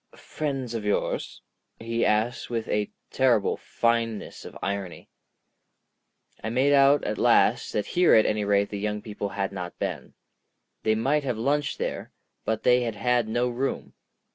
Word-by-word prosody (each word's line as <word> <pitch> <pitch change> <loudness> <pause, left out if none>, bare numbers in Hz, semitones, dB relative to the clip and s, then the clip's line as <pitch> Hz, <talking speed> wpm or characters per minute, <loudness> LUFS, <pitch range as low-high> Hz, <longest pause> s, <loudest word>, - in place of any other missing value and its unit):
"Friends 135 -5 -4
of 115 -2 -3
yours?" 105 0 -2 0.4
he 115 +1 -1
asked 110 +3 0
with 115 -2 -2
a 105 -1 0 0.2
terrible 120 -6 +2
fineness 115 -2 -1
of - - -9
irony. 100 -3 -5 1.3
I 110 - -2
made 130 +5 +3
out 140 +1 +5
at 105 - -3
last - - +3
that 105 - 0
here 180 0 +4
at 110 - +6
any 105 0 0
rate 100 0 +2
the 100 - -4
young 105 0 -3
people 105 -2 -4
had 100 0 -2
not 90 -3 -6
been. - - -4 0.7
They 110 0 +2
might 140 +7 +1
have 125 -5 -2
lunched 145 +5 0
there, - - -4 0.3
but 110 -1 -1
they 125 0 +5
had 115 -3 -2
had 120 +2 +1
no 120 +3 0
room. 125 +3 -3
115 Hz, 160 wpm, -26 LUFS, 105-125 Hz, 1.3 s, at